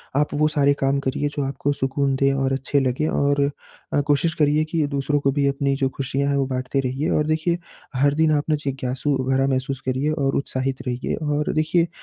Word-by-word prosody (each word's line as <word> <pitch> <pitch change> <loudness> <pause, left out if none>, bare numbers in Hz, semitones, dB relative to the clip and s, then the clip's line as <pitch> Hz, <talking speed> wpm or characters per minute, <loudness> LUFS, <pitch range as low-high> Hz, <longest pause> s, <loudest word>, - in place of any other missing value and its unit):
आप 145 +1 +1
वो 150 +1 +3
सारे 145 -2 +3
काम 135 +1 +2
करिए 140 +2 -1
जो 145 - -1
आपको 135 +1 -1
सुकून 135 0 0
दें 135 +1 +3
और 135 -1 0
अच्छे 135 +2 0
लगें। 135 +3 0
और 140 -2 +1 0.5
अ, - - +3
कोशिश 150 +3 +2
करिए 150 0 +3
कि 160 -1 0
दूसरों 140 +1 0
को 140 -1 +1
भी 140 +1 +1
अपनी 140 0 0
जो 135 -1 0
खुशियाँ 140 +1 -2
हैं 140 - +1
वो 135 - +1
बाँटते 130 +1 -2
रहिए 135 +3 -1
और 150 - +2
देखिए 160 +2 +1 0.4
हर 140 +2 +3
दिन 160 0 +3
आप 145 -1 +2
न - - +4
जिज्ञासू 135 +1 -1
भरा 135 0 +2
महसूस 135 0 -1
करिए 130 +4 0
और 140 -3 0
उत्साहित 135 -1 -2
रहिए। 125 0 -2
और 150 -1 -1
देखिए 165 +2 +2
140 Hz, 210 wpm, -22 LUFS, 135-150 Hz, 0.5 s, न